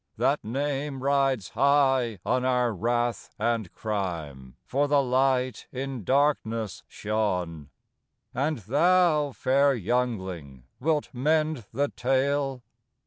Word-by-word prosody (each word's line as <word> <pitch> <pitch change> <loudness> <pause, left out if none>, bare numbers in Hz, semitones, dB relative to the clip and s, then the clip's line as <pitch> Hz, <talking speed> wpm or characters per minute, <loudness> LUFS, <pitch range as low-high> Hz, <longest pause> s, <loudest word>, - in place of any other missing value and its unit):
" - - -45
That - - +1
name 135 +3 -3
rides 135 -6 +1
high 135 -3 +2
on 125 0 +1
our 125 -2 +1
wrath 120 +1 -1
and 110 -3 -1
crime, 80 - -4
For 145 +3 +1
the 145 0 +4
Light 130 -2 +1
in 130 -3 -5
darkness 115 -6 0
shone. 90 -8 -2 0.3
" - - -53 0.3
And 145 +5 0
thou, 150 - +3
fair 140 +2 +2
youngling, 95 - -2 0.2
wilt 150 +2 0
mend 155 -1 0
the 140 +4 0
tale? 135 0 0
125 Hz, 115 wpm, -26 LUFS, 110-140 Hz, 0.3 s, the